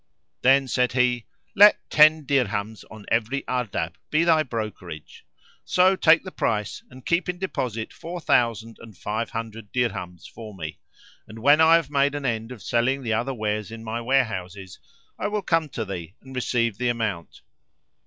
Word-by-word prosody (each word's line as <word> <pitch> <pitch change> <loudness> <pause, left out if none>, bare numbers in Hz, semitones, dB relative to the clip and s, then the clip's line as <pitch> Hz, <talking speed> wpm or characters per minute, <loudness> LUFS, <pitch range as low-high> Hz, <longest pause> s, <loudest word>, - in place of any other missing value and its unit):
Then 135 +1 +4
said 125 -1 +1
he, 125 -2 +1 0.3
"Let 205 +1 +8
ten 155 0 +6
dirhams 110 -6 -1
on 110 -1 -12
every 120 +5 0
Ardabb 110 -10 -2 0.2
be 155 +2 +2
thy 165 -2 +4
brokerage; 105 - -7 0.4
so 185 +1 +3
take 165 -3 +5
the 185 - -8
price 105 - -2
and 130 -1 -14
keep 170 +1 0
in 180 - -2
deposit 125 - -4
four 175 +2 -7
thousand 115 -6 +1
and 110 -5 -13
five 110 +5 -3
hundred 115 -2 -7
dirhams 95 -8 -3
for 110 -3 -10
me; 80 -4 -7 0.5
and, 110 - -11
when 145 +7 +5
I 160 +1 +7
have 165 -4 0
made 140 0 +2
an 145 -1 -4
end 115 -1 -2
of 115 -7 -10
selling 130 +6 0
the 115 -2 -1
other 120 +4 -1
wares 105 -1 -2
in 115 0 -9
my 115 +1 -4
warehouses, 100 -7 -2 0.4
I - - -1
will 205 -1 -2
come 165 -3 +1
to 115 -4 -4
thee 90 -2 -7
and 130 0 -13
receive 115 -4 0
the 125 -1 +1
amount." 110 -8 -3
120 Hz, 175 wpm, -24 LUFS, 110-140 Hz, 0.5 s, Let